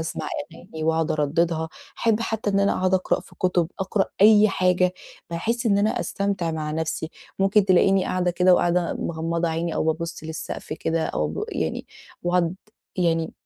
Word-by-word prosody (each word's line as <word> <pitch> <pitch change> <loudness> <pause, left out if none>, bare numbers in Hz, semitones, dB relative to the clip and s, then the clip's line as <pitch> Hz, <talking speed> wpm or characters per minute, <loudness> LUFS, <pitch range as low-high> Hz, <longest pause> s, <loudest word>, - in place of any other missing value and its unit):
أسمَع 160 0 -4 0.2
أغاني 165 -2 -8
وأقعُد 160 0 +1
أردّدها، 160 +2 0 0.3
أحب 225 -1 +2
حتى 220 -2 -1
إن 200 0 +2
أنا 200 - +3
أقعُد 185 0 +2
أقرأ 185 - +1
في - - -17
كُتب، 180 -2 +1
أقرأ 195 +1 +1 0.2
أي 215 +1 +7
حاجة 180 -1 +2 0.4
بحيث 230 +8 -1
إن 200 -2 +3
أنا 215 +2 +1
أستمتع 200 -4 -1
مع 155 -1 -3
نفسي. 160 0 -3 0.3
ممكن 195 +1 +4
تلاقيني 190 0 +4
قاعدة 180 -1 0
كده، 180 +1 +4
وقاعدة 175 0 +1
مغمّضة 165 +1 -2
عيني، 165 +1 -2
أو - - 0
بابُص 165 0 -2
للسقف 160 -1 -6
كده 160 +1 -1
أو 75 - -1
أب 75 - -4
يعني - - -3 0.4
وأقعُد 175 -1 +1 0.4
يعني 165 -3 +1
175 Hz, 165 wpm, -24 LUFS, 160-195 Hz, 0.4 s, أي